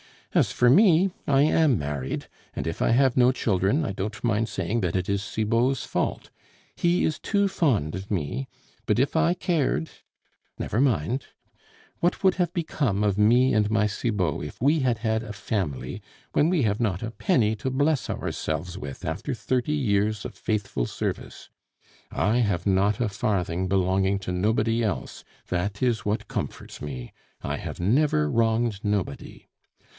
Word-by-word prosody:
"As - - +3
for 120 - +3
me, 185 - +5 0.2
I 140 -1 +4
am 155 -4 +3
married; 70 -3 -4 0.3
and - - -3
if 80 0 -4
I - - +3
have 130 +1 +3
no 125 0 +6
children, 105 - +1
I - - -2
don't 105 +3 -5
mind 115 -1 +1
saying 95 +6 -1
that 90 -4 -1
it 90 -1 -1
is 100 0 +1
Cibot's 115 +5 0
fault; - - -2 0.4
he 175 +1 +2
is 155 - 0
too 200 -1 +1
fond 130 - +1
of 95 +2 -7
me, 100 - -2 0.4
but - - +1
if 135 +5 +1
I 165 +2 +3
cared 150 - 0 0.7
never 110 - -2
mind. 125 - +1 0.7
What 175 +3 0
would 190 -1 +4
have 180 -2 0
become 140 - -1
of 100 -2 +1
me 120 +5 +4
and 105 -2 +2
my 110 -1 +2
Cibot 100 -7 -1
if - - -8
we 145 +5 +3
had 125 -4 +1
had 110 0 0
a 110 -2 -7
family, 95 -8 -3 0.3
when 155 - +3
we 175 -6 +2
have 105 -1 +1
not 105 -4 -1
a 115 - -4
penny 115 - +1
to 130 - -2
bless 140 -1 +1
ourselves 85 +4 -3
with 75 -1 -7
after 90 - -3
thirty 125 +5 -1
years' 105 -6 +1
of - - -6
faithful 105 - -2
service? - - -5 0.6
I 105 - +1
have 100 -8 0
not 100 +1 +2
a 115 - +1
farthing 95 -3 -1
belonging 95 +1 +2
to 95 - -5
nobody 110 +5 +1
else, 110 -3 -3 0.2
that 100 +5 -2
is 115 -6 +1
what 105 +2 -2
comforts - - -5
me. 65 -5 -6 0.3
I - - -2
have - - -6
never 100 - +2
wronged 115 -1 +1
nobody. 100 -8 -3
110 Hz, 165 wpm, -25 LUFS, 95-130 Hz, 0.7 s, no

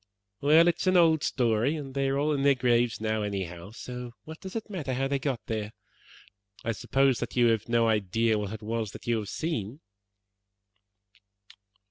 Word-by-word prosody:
Well, 155 +4 +6
it 175 - +2
is - - -2
an 185 0 +5
old 160 -3 +5
story, 120 +3 +1
and 140 -4 -6
they 135 0 0
are 135 - 0
all 150 +2 +1
in 140 - -1
their 140 0 +4
graves 120 -1 +2
now, 110 0 -1
anyhow, 95 -3 -4
so 125 +2 -8
what 160 +4 -10
does 190 +2 -8
it 225 - -4
matter 160 - -3
how 135 +1 0
they 140 0 -1
got 130 -4 -3
there? 110 -1 -3 0.9
I 115 - +1
suppose 135 +3 +1
that - - -5
you 120 -2 +5
have 115 0 0
no 115 -1 +3
idea 110 +1 +1
what 100 -1 -4
it 110 0 -7
was 110 -1 -3
that - - -10
you 120 -1 +1
have 105 - -6
seen?" 135 - -3
120 Hz, 190 wpm, -28 LUFS, 110-140 Hz, 0.9 s, Well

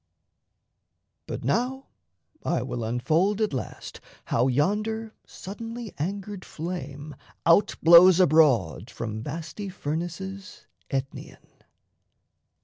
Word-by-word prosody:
But - - -5
now 265 +3 -1 0.5
I - - 0
will 120 - -4
unfold 160 - +1
At 215 -8 0
last 130 - -6 0.2
how 120 +2 +2
yonder 215 - 0
suddenly 225 +3 -8
angered 195 +3 -4
flame 150 -4 -6 0.3
Out 170 +5 +4
blows 170 +2 +8
abroad 135 - +3
from 110 -2 -5
vasty 165 - -6
furnaces 180 +4 -5 0.2
Aetnaean. 135 -2 -4
170 Hz, 90 wpm, -26 LUFS, 140-205 Hz, 0.5 s, blows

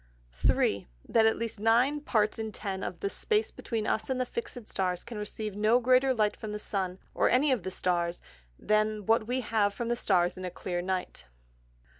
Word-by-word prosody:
3. 95 +9 +1 0.2
That 220 -1 +4
at 220 - +2
least 230 -2 -4
Nine 240 +7 +3
Parts 215 -6 +1
in 220 -1 -3
Ten 195 -2 -4
of - - -5
the 400 - 0
Space 430 +2 0
between 225 -2 -3
us 220 - -1
and 260 -1 0
the 255 - +1
fix'd 260 - -6
Stars, 180 -2 -1
can 235 -3 -7
receive 210 0 -5
no 215 +4 +4
greater 255 +2 +4
Light 215 -4 +1
from 215 -1 -6
the - - -2
Sun, 190 -3 -3 0.2
or - - +3
any 275 +3 +3
of 250 -5 +1
the 185 - -4
Stars, 175 -2 -1 0.4
than 215 -1 +1
what 225 0 +3
we 255 +2 0
have 210 -3 +1
from 235 -1 -3
the 240 - +2
Stars 185 -6 +1
in - - -6
a 180 - -2
clear 175 0 -3
Night. 185 - -3
215 Hz, 205 wpm, -29 LUFS, 190-240 Hz, 0.4 s, That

